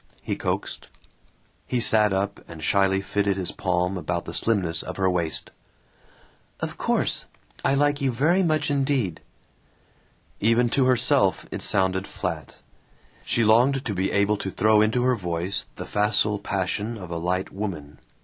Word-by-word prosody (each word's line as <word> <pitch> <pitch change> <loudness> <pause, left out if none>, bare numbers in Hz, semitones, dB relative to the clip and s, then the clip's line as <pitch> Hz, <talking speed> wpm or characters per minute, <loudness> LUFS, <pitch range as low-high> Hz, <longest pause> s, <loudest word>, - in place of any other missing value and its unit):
he - - -2
coaxed. - - -3 0.8
He 125 - 0
sat 110 -3 +5
up 100 +1 -2
and 80 -2 -10
shyly 95 +2 +2
fitted 100 0 0
his 95 -2 -3
palm 90 0 -1
about 85 -1 -3
the - - -7
slimness 90 -7 +1
of 90 - -7
her 95 -1 +2
waist. 85 -3 -1 1.1
"Of - - -4
course. - - 0 0.4
I 135 - +2
like 145 +1 +1
you 135 -1 +1
very 155 +10 +2
much 155 -4 +1
indeed." 135 - 0 1.2
Even 115 +2 +2
to 135 0 +3
herself 130 -4 +2
it - - -4
sounded 95 0 +2
flat. - - -5 0.7
She 115 - +1
longed 125 +5 +3
to 105 - -2
be 95 +1 -1
able 100 +1 +2
to 100 - -4
throw 105 +2 +3
into 110 +3 +2
her 125 0 +3
voice 90 -1 -3
the - - -7
facile 105 0 +1
passion 100 +3 -2
of 90 -4 -9
a 85 - -2
light 90 +3 -2
woman. 80 -9 -6
100 Hz, 155 wpm, -24 LUFS, 95-120 Hz, 1.2 s, sat